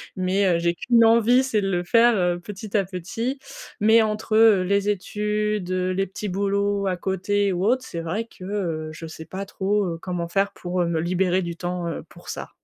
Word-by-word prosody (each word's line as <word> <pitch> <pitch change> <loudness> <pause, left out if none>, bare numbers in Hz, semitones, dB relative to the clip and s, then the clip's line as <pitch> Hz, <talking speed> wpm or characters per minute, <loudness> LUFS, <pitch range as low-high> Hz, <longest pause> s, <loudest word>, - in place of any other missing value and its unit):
mais 190 +2 +1
heu, 175 -2 +3
j'ai 170 0 +1
qu'une 230 +6 +3
envie, 230 +2 +5
c'est 230 -5 0
de 195 -1 -1
le 175 -1 0
faire, 230 +5 +4
heu, 175 -2 +1
petit 205 +2 -4
à 195 - +1
petit 210 +9 -4 0.4
mais 220 +2 +5
entre, 215 0 -2
heu, 220 -4 +6
les 200 +2 +1
études, 210 -1 -2
heu, 185 0 0
les 195 +1 0
petits 200 +2 -6
boulots 200 +1 0
à 185 -1 0
côté 195 +2 0
ou 180 +1 -1
autre, 255 +4 +2
c'est 170 -8 -6
vrai 180 +8 -3
que, 215 -4 -15
heu, 170 -6 -3
je 160 +1 -8
sais 160 0 -9
pas 190 +4 -6
trop, 200 +1 0
heu, 165 -1 -3
comment 175 -2 -3
faire 195 +3 0
pour, 180 0 -3
heu, - - +2
me 165 -1 0
libérer 180 +2 +1
du 170 -1 -4
temps, 175 0 -3
heu, 165 - -4
pour - - -14
ça. - - -6
195 Hz, 220 wpm, -23 LUFS, 180-210 Hz, 0.4 s, heu